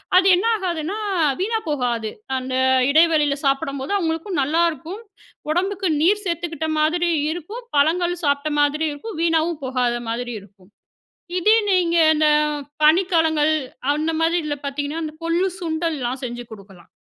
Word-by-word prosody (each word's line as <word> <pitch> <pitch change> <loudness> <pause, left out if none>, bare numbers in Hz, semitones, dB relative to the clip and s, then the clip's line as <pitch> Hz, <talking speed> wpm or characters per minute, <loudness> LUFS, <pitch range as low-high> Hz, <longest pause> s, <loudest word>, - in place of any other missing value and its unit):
அது 370 +1 +6
என்ன 370 +5 -1
ஆகாதுன்னா? 360 -1 -3 0.4
வீணா 445 +4 0
போகாது. 240 -6 -1 0.3
அந்த 255 0 -4 0.3
இடைவெளியில 305 -1 +4
சாப்பிடும்போது 275 +1 -1
அவங்களுக்கும் 330 0 -2
நல்லாயிருக்கும். 330 +4 -1 0.5
"உடம்புக்கு 380 +3 -1
நீர் 410 +6 +3
சேர்த்துக்கிட்ட 335 -3 -3
மாதிரி 345 +3 +1 0.2
இருக்கும். 355 +9 -7
பழங்கள் 345 +4 +2
சாப்பிட்ட 285 +1 0
மாதிரி 290 +2 +2
இருக்கும். 315 +7 -8
வீணாவும் 330 -1 +1
போகாத 250 -2 0
மாதிரி 240 +1 -3
இருக்கும்." 195 -1 -21 0.7
இதே 425 +5 +4
நீங்க 350 -3 +2 0.2
இந்த 310 0 +2 0.6
பனிக்காலங்கள் 320 -2 +3 0.4
அந்த 310 +2 -1
மாதிரி 330 +2 +2
இதில 290 -1 -3
பார்த்தீங்கன்னா 290 +3 -3
அந்த 305 -1 -6
கொள்ளு, 335 +3 +1
சுண்டல் 325 -1 -2
எல்லா 245 0 -2
செஞ்சி 240 0 -5
கொடுக்கலாம். 195 -5 -14
315 Hz, 130 wpm, -21 LUFS, 280-345 Hz, 0.7 s, அது